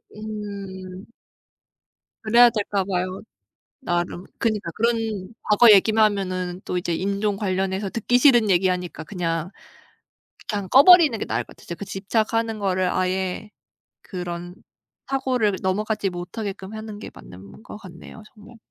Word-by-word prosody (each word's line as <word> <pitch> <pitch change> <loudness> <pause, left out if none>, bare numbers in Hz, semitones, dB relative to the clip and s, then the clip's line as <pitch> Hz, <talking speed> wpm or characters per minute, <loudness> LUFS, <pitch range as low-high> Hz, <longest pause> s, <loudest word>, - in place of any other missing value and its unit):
으음. 200 -3 -7 1.2
그래야 235 +2 +6
될까 205 -3 -1
봐요, 185 0 -3 0.6
나름. 175 -3 -2
그니까 215 -6 -1
그런 225 -3 -1
과거 215 +2 +6
얘기만 215 +2 +5
하면은 185 -3 -2
또 180 - -2
이제 170 -1 -2
인종 200 +3 -1
관련해서 190 0 -2
듣기 245 +2 +1
싫은 240 -6 +5
얘기하니까 180 -2 0
그냥 165 -1 -3 1.0
그냥 205 -3 -2
꺼 270 +2 +7
버리는 335 -10 +7
게 - - -4
나을 - - -2
것 - - -28
같아. - - -16
진짜 170 - -6
그 200 - -8
집착하는 220 +3 -1
거를 185 -2 0
아예 185 +2 -2 0.5
그런 175 -1 -6 0.5
사고를 255 -7 0
넘어가지 205 +1 -1
못하게끔 190 +3 -6
하는 215 -1 -7
게 - - -9
맞는 95 - -13
것 230 - -10
같네요, 185 +2 -12
정말. 215 +2 -15
200 Hz, 290 characters per minute, -23 LUFS, 185-220 Hz, 1.2 s, 꺼